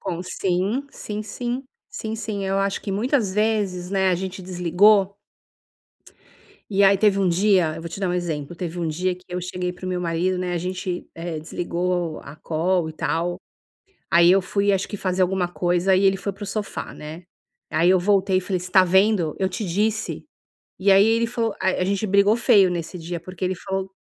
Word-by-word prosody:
Com 175 0 -4
Sim, 195 +9 -1
sim, 210 -4 -6
sim, 245 +5 -4 0.3
sim, 220 - -5
sim. 210 -3 -4
Eu 195 0 0
acho 195 0 -1
que 200 - -4
muitas 225 -1 0
vezes, 200 -4 0
né, 190 -1 +2
a - - +3
gente 190 +1 -5
desligou 190 +3 +3 1.5
e 200 0 +4
aí, 195 0 +5
teve 205 -2 +3
um 190 - +2
dia 180 -3 +3
eu 165 - -6
vou 170 - -6
te 165 - -7
dar 195 - -1
um - - -1
exemplo, 170 -3 -3
teve 175 0 -5
um 170 - -1
dia 180 +4 -1
que 180 - -18
eu 180 0 -3
cheguei 180 0 -3
para 185 +1 -9
o - - -2
meu 180 -1 -2
marido, 175 +2 0
né, 180 -1 -2
a 175 - -1
gente, 180 0 -4
eh, 165 -1 -5
desligou 175 +1 -2
a 140 +2 -11
call 165 +1 0
e - - -10
tal. 175 +3 -2 0.7
Aí 170 +1 +6
eu 190 - +6
fui, 200 +2 +1
acho 195 -1 0
que 205 - -6
fazer 185 -1 0
alguma 185 -1 0
coisa 175 +1 +1
e 190 - +2
ele 195 0 +4
foi 200 +1 -3
para 200 +2 -10
o - - -4
sofá, 205 +1 -5
né, 155 +4 -9 0.5
aí 165 +3 +3
eu 185 -1 +5
voltei 195 0 +2
e - - 0
falei: 185 0 -2
"Você 180 +1 -8
tá 190 0 +7
vendo, 190 -3 +2
eu 190 -1 +1
te 210 +4 -4
disse". 210 +5 -1 0.6
E 195 +1 +4
aí 195 +2 +7
ele 230 +1 +2
falou 230 -2 -1
a - - 0
a 185 - 0
gente 200 +3 -1
brigou 200 +2 +4
feio 200 -5 +4
nesse 175 +1 -4
dia, 170 +1 -5
porque 185 +2 -6
ele 185 - 0
falou 190 +1 -4
185 Hz, 210 wpm, -23 LUFS, 175-200 Hz, 1.5 s, tá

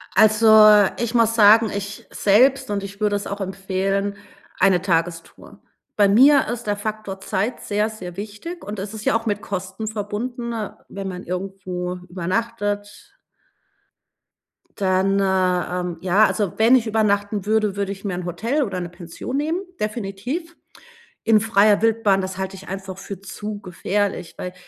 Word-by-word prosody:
Also, 215 -1 +7
ich 235 -1 -2
muss 230 -1 +3
sagen, 220 +1 +6
ich 200 0 -6
selbst, 250 +7 +3
und 200 -1 -2
ich 200 0 -9
würde 210 -1 +1
es 205 - -3
auch 200 +1 -5
empfehlen 195 +1 -2 0.4
eine 185 -2 +4
Tagestour. 165 -2 -3 0.3
Bei 205 -1 +4
mir 270 +7 +6
ist 240 -1 -5
der 205 - +1
Faktor 205 -2 -5
Zeit 205 +5 -2
sehr, 210 +1 0
sehr 185 -5 -9
wichtig, 215 - -7
und 210 +1 -6
es 200 +2 -5
ist 215 -1 -8
ja - - +3
auch 225 - -10
mit 205 -2 -1
Kosten 190 +2 -5
verbunden, 225 +3 -4 0.4
wenn 195 0 -6
man 180 -1 -6
irgendwo 180 -1 -4
übernachtet. 205 +3 -3 1.6
Dann, 195 0 +2
äh, 185 -2 +1
ähm 180 -2 -4
ja, 190 +4 +4
also, 205 -5 -1
wenn 230 +4 +6
ich 235 -3 +2
übernachten 205 -2 0
würde, 215 -2 +1
würde 200 -1 -2
ich 195 +1 -8
mir 195 - -2
'n 180 0 -4
Hotel 230 - -1
oder 195 -7 -3
'ne 175 -1 -5
Pension 175 +8 -7
nehmen, 315 +5 -1 0.2
definitiv. 235 - -4 0.7
In 220 -1 +5
freier 210 -1 +3
Wildbahn, 225 -4 +3
das 190 0 -5
halte 190 0 -4
ich 195 +1 -12
einfach 190 0 -6
für 190 -1 -8
zu 205 +1 -7
gefährlich, 190 0 -2
weil 180 - -6
205 Hz, 160 wpm, -22 LUFS, 190-220 Hz, 1.6 s, Also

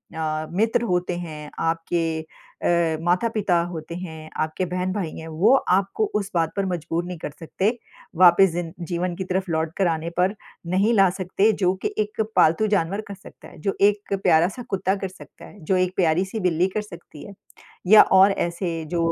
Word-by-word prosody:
अ, 155 -1 -2
मित्र 220 +6 +1
होते 180 -4 -1
हैं, 155 -4 -7
आपके 165 +1 -1 0.6
अ, 170 -2 +2
माता-पिता 185 +1 +1
होते 165 0 -7
हैं, 160 -3 -8
आपके 155 +4 -2
बहन-भाई 180 0 -2
हैं, 160 - -8
वो 170 +10 +3
आपको 195 - +1
उस 205 -1 -1
बात 165 -2 +1
पर 195 - 0
मजबूर 170 -2 -2
नहीं 180 0 -6
कर 150 - -5
सकते, 185 +4 -1 0.5
वापिस 180 +2 +6
जिन 170 -1 -4 0.2
जीवन 175 +1 -1
की 190 - -4
तरफ 185 0 -2
लौट 160 0 -1
कर 195 - +2
आने 165 0 -2
पर 185 +3 +2 0.4
नहीं 200 +5 +3
ला 195 -4 +5
सकते, 195 +3 +2
जो 185 -3 +1
कि - - -2
एक 210 +1 -1
पालतू 170 +7 +4
जानवर 200 0 0
कर 200 - -7
सकता 190 - -15
है। - - -15
जो 195 +4 -1
एक 205 0 +2
प्यारा-सा 175 +7 +2
कुत्ता 190 0 0
कर 195 -1 -4
सकता 185 - -14
है, 205 - -15
जो 190 +5 +1
एक 185 0 0
प्यारी-सी 185 +4 +1
बिल्ली 180 -2 +1
कर 215 - +1
सकती 170 -7 -12
है 200 - -10 0.5
या 215 +3 +9
और 190 +1 +7
ऐसे 175 -1 -2 0.2
जो 165 -1 +1
180 Hz, 185 wpm, -23 LUFS, 165-195 Hz, 0.6 s, या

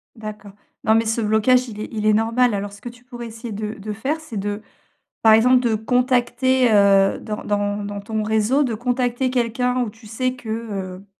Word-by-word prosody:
D'accord. 215 -2 -8 0.3
Non, 220 - +4
mais 225 0 +2
ce 225 +1 0
blocage 220 +4 +3
il 210 -2 -9
est 215 - -5
il 215 -2 -3
est 215 - +5
normal. 230 +2 +2
Alors 200 0 -3
ce 200 - -14
que 240 - -6
tu 245 +1 -16
pourrais 240 -1 -8
essayer 230 +1 -8
de 210 +1 -4
de 210 +1 -6
faire, 270 +9 -2
c'est 310 -9 -8
de, 205 +1 -3 0.6
par 220 - +7
exemple, 250 +3 +5
de 235 -3 +1
contacter, 250 +2 +2
heu, 200 -1 +4
dans 210 -1 -6
dans 205 0 -1
dans 205 0 -5
ton 215 +1 -3
réseau, 220 +6 +2
de 240 -5 -1
contacter 245 +2 -1
quelqu'un, 250 +1 0
où 235 - -3
tu 225 +1 -18
sais 255 +4 -2
que, 245 -3 -12
heu, 200 -4 -5
225 Hz, 210 wpm, -21 LUFS, 210-245 Hz, 0.6 s, par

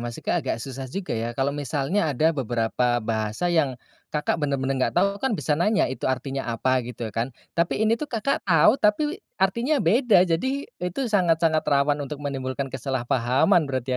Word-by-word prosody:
maksudnya 120 -1 -2
agak - - -2
susah 130 +2 -7
juga 190 +3 -4
ya. 115 +1 -3
Kalau 135 +1 0
misalnya 145 - -1
ada 160 +4 +3
beberapa 120 -2 0
bahasa 110 +8 -1
yang 140 -6 +1 0.4
Kakak 150 +2 0
bener-bener 135 -2 -1
gak 130 - 0
tahu, 200 +3 +2
kan 250 -2 0
bisa 155 - -1
nanya 205 +4 +3
itu 130 - -4
artinya 135 +1 -2
apa 130 +3 +1
gitu 120 -2 -5
kan. 115 +4 -2 0.2
Tapi 170 +5 0
ini 220 - +3
tuh 300 - -2
Kakak 235 +3 -1
tau, 165 +2 +6
tapi 295 - +1 0.2
artinya 255 +6 +1
beda. 215 +1 +4
Jadi, 260 +12 -1
e 180 - -6
itu 180 +10 -3
sangat-sangat 165 -5 +3
rawan 145 +1 +2
untuk 145 +1 -6
menimbulkan 135 -1 -3
kesalahpahaman 130 - +1
berarti 130 -1 -3
145 Hz, 170 wpm, -24 LUFS, 130-180 Hz, 0.4 s, tau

